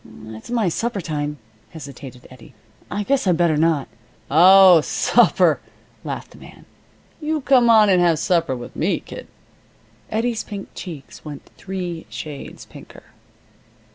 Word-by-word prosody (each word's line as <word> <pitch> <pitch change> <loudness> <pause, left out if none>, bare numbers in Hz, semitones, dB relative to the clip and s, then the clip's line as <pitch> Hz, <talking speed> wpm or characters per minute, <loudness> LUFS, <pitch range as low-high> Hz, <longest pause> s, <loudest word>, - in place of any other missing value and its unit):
"It's 110 - -11
my 235 -5 0
supper 225 +5 -2
time," 150 -3 -4 0.3
hesitated 135 -4 -11
Eddie. 130 0 -16 0.3
"I 205 +3 -3
guess 270 0 0
I'd 175 -3 +3
better 170 -2 +2
not 155 -2 +1 0.3
" - - -24
"Oh, 180 +2 +7
supper," - - +2 0.4
laughed - - -6
the - - -16
man. - - -15 0.6
"You 310 0 -2
come 255 -3 +4
on 220 -2 +6
and 185 -2 +3
have 170 -2 +3
supper 165 -4 0
with 120 -1 -10
me, - - 0
kid." - - -10 0.8
Eddie's 225 +1 -2
pink 200 -2 -8
cheeks 160 -7 -10
went 150 -2 -9
three 180 -4 -6
shades 145 -3 -9
pinker. - - -14
175 Hz, 140 wpm, -21 LUFS, 150-210 Hz, 0.8 s, Oh